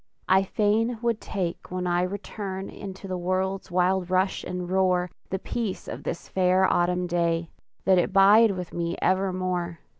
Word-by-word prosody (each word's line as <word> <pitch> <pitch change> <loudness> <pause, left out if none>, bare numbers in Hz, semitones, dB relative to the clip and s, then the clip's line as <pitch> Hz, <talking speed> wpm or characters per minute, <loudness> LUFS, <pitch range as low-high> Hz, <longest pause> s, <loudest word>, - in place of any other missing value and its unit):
I 190 +1 +5
fain 215 +4 +1
would 230 -2 0
take 180 -4 -4
when 180 0 -3
I 175 0 +1
return 195 0 -4
Into 195 0 -8
the 185 -1 -3
world's 190 +2 -1
wild 180 0 +1
rush 185 +1 +1
and 180 -1 -4
roar, 180 -1 +1 0.2
The 190 - -1
peace 215 0 -4
of - - -6
this - - -5
fair 185 0 +3
autumn 180 0 +1
day, 170 -1 0 0.3
That 190 -1 +5
it 175 - 0
bide 205 +4 +7
with 180 -1 -6
me 170 0 -2
evermore! 185 -2 0
185 Hz, 160 wpm, -26 LUFS, 180-195 Hz, 0.3 s, bide